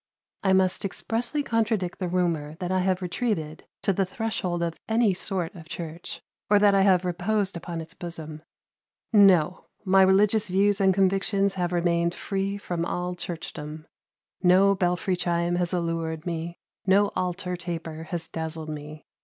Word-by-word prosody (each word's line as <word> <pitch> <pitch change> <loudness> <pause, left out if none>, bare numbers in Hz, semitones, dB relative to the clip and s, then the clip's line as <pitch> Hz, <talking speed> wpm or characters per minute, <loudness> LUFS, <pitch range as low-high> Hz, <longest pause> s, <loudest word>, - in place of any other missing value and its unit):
"I 190 - +2
must 190 -1 +2
expressly 235 +8 -1
contradict 220 -7 0
the 185 - -1
rumor 170 -4 -1
that 180 +2 -4
I 185 - +2
have 185 0 0
retreated 175 -5 -2 0.2
to 195 - +2
the 195 - +1
threshold 185 -3 -2
of 165 -1 -3
any 220 -2 +3
sort 185 -1 -2
of 165 -4 -12
church, 165 0 -6 0.3
or 205 - +6
that 205 0 +5
I 195 - +4
have 185 -2 +4
reposed 190 +3 0
upon 170 -1 -5
its 160 +2 -10
bosom. 160 -4 -7 0.7
No! 185 -5 +5 0.2
My 190 0 +5
religious 205 +3 +4
views 200 +2 +2
and 190 -1 +5
convictions 195 +1 +2
have 180 -2 -1
remained 170 -1 +1
free 195 0 -2
from 175 -4 -3
all 180 +1 -2
churchdom; 155 -3 -7 0.6
no 190 +2 +5
belfry 180 0 0
chime 175 0 0
has 175 -1 0
allured 165 -2 -2
me, 170 0 -4 0.3
no 200 +2 +5
altar 180 0 -2
taper 165 -2 -6
has 170 -1 -4
dazzled 160 -1 -5
me. 150 0 -8
180 Hz, 155 wpm, -26 LUFS, 170-195 Hz, 0.7 s, or